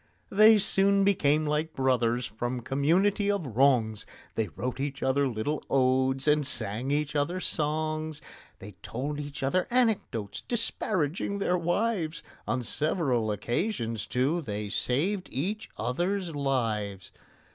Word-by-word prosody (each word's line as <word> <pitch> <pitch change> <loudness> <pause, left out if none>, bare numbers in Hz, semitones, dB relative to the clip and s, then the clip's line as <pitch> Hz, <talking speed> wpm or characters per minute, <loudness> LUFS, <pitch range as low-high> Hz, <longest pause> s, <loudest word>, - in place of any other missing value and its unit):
They 215 +2 +7
soon 195 0 +4
became 155 -6 +2
like 150 +2 -1
brothers 125 -2 +1
from 120 +4 -4
community 175 - +2
of 200 -5 0
wrongs: 120 -4 +2 0.3
They 110 - -1
wrote 120 +8 -5
each 140 0 -3
other 140 +1 +2
little 130 +5 -2
odes 130 +1 +2
and 150 -2 +3
sang 110 +2 -1
each 145 +1 -1
other 160 +6 0
songs; 155 -1 -1 0.4
They 105 - -10
told 145 +5 -4
each 145 -1 -6
other 180 +7 +1
anecdotes 210 - 0
disparaging 200 - -1
their 190 -2 +1
wives; 175 -1 -1 0.2
On 125 - -1
several 130 - 0
occasions, 115 - -2
too, 140 +8 0
they 105 -6 -4
saved 180 - -1
each 200 - -3
other's 175 +4 -1
lives. 115 -8 -2
145 Hz, 125 wpm, -28 LUFS, 125-175 Hz, 0.4 s, They